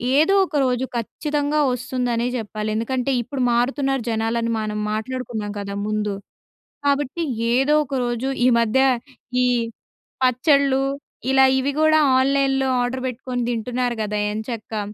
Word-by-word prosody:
ఏదో 315 +7 +4
ఒక 335 - -8
రోజు 250 0 0
ఖచ్చితంగా 295 +5 -1
వస్తుందనే 245 -1 -1
చెప్పాలి. 215 -1 -4
ఎందుకంటే 250 +4 -1
ఇప్పుడు 255 +3 -5
మారుతున్నారు 270 +2 0
జనాలు 225 +1 0
అని 230 0 -1
మనం 210 0 -3
మాట్లాడుకున్నాం 220 -2 -4
కదా! 200 0 -5
ముందు. 210 -1 -1 0.7
కాబట్టి 285 +3 0 0.3
ఏదో 270 +4 +3
ఒకరోజు 250 -2 -2 0.2
ఈ - - +5
మధ్య 230 +2 +2 0.6
ఈ - - +3 0.8
పచ్చళ్లు 270 +1 +3 0.5
ఇలా 265 0 +6
ఇవి 265 +2 0
గూడా 310 0 +5 0.2
ఆన్లైన్‌లో 270 0 +2
ఆర్డర్ 250 +1 -2
పెట్టుకొని 250 0 -3
తింటున్నారు 245 +1 -1
గదా 210 0 -2
ఎంచక్కా. 220 0 -4
250 Hz, 125 wpm, -22 LUFS, 230-270 Hz, 0.8 s, ఇలా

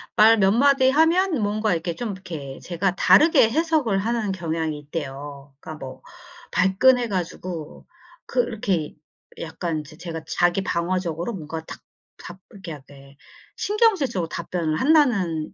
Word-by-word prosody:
말 225 +1 +6
몇 195 -1 +4
마디 265 +3 +4
하면 325 - +3
뭔가 215 0 0
이렇게 170 0 -2
좀 235 +3 -4
이렇게 160 -8 -8
제가 180 +1 -1
다르게 300 - +5
해석을 305 -6 +1
하는 220 0 -1
경향이 160 -4 -3
있대요. 145 -1 -7
그니까 155 - -8
뭐 130 -3 -9 0.5
발끈해 240 +6 +3
가지고 175 -3 -5 0.4
그 - - +1
이렇게 190 - -2 0.5
약간 165 -1 -3
이제 155 +1 -14
제가 165 -2 -6
자기방어적으로 175 +1 -1
뭔가 160 -3 -6
딱 - - -9 0.4
답 180 +1 -10
이렇게 190 -4 -10
약간 140 -1 -13 0.4
신경질적으로 370 - +1
답변을 165 -2 -3
한다는 220 - +2
185 Hz, 305 characters per minute, -23 LUFS, 160-235 Hz, 0.5 s, 말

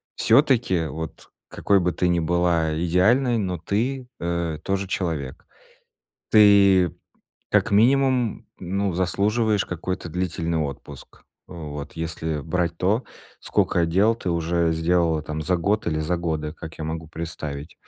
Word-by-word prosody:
всё-таки, 115 - +3
вот 80 +2 -7 0.2
какой 100 -1 +2
бы 90 -1 +1
ты 90 - 0
ни 85 -1 +2
была 85 -1 +1
идеальной, 115 +9 +3
но 95 -4 -2
ты, 125 +9 -2
э, 85 -2 -2
тоже 95 0 -1
человек. 80 -8 -3 0.9
Ты, 100 -5 +6 0.6
как - - +2
минимум, 125 +2 +2
ну, 95 +2 -2
заслуживаешь 105 +4 +1
какой-то 90 +1 -4
длительный 85 -1 -2
отпуск. 70 -2 -7 0.3
Э, - - -11
вот. 75 -4 -7
Если 80 -1 -3
брать 85 +1 -1
то, 105 +8 +1 0.4
скока 85 -1 +1
дел 100 +7 +3
ты 110 - -6
уже 85 0 +1
сделала 80 -1 +1
там 75 +1 -5
за 90 +4 +1
год 100 +5 0
или 80 -2 0
за 85 +3 -1
годы, 80 -3 -3
как 80 -1 -10
я 80 - -4
могу 80 0 -5
представить. 80 -2 -6
85 Hz, 140 wpm, -23 LUFS, 80-100 Hz, 0.9 s, Ты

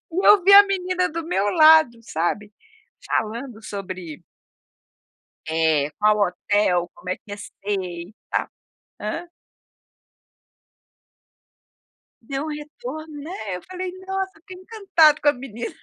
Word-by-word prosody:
E 370 +4 0
eu 415 -2 +7
vi 390 +3 +5
a 405 0 +10
menina 370 -2 -1
do 330 +1 -5
meu 310 - 0
lado 310 -5 +6
sabe? 205 +3 -3 0.5
Falando 225 +1 -3
sobre 185 -7 -7 1.2
eh, 160 -2 +1
qual 210 0 +3
hotel, 180 -2 +1
como 180 - -8
é 185 - -1
que - - -38
ia 205 - -6
ser 205 - -11
e 185 -2 -4 0.2
tal, - - -1 0.5
hã? 335 +12 -5 2.9
Deu 270 +5 -4
um - - -5
retorno, 300 0 -8
né, 250 - -5
eu - - -10
falei: 370 0 -6 0.2
"Nossa", 385 0 -2
eu - - -21
fiquei 365 +2 -12
encantado 370 -7 +3
com 295 - +2
a - - +6
menina, 245 -3 -7
265 Hz, 135 wpm, -22 LUFS, -, 2.9 s, a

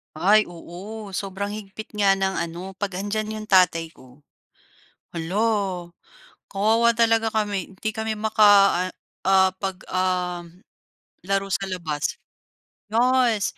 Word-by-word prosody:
Ay, 205 +7 +5
oo, 190 +5 -9
sobrang 200 +1 -4
higpit 215 +1 -8
nga 200 -1 +4
ng 190 0 0
ano, 175 +3 -5
'pag 190 -1 -4
'andiyan 215 +2 -2
'yong 215 0 -6
tatay 180 -4 +4
ko. 130 +2 -18 0.9
Hala, 185 0 -1 0.6
kawawa 225 +4 +2
talaga 225 -1 +2
kami. 205 -3 -2
'Di 220 - 0
kami 220 -1 -3
maka, 215 0 +3 0.4
ah - - -5 0.4
ah, 190 0 +5
'pag, 190 -1 -3
um, 180 -1 -2 0.6
laro 195 0 0
sa 195 - -1
labas. 160 -5 -2 0.8
Yes. 240 -3 +3
195 Hz, 120 wpm, -23 LUFS, 180-215 Hz, 0.9 s, Ay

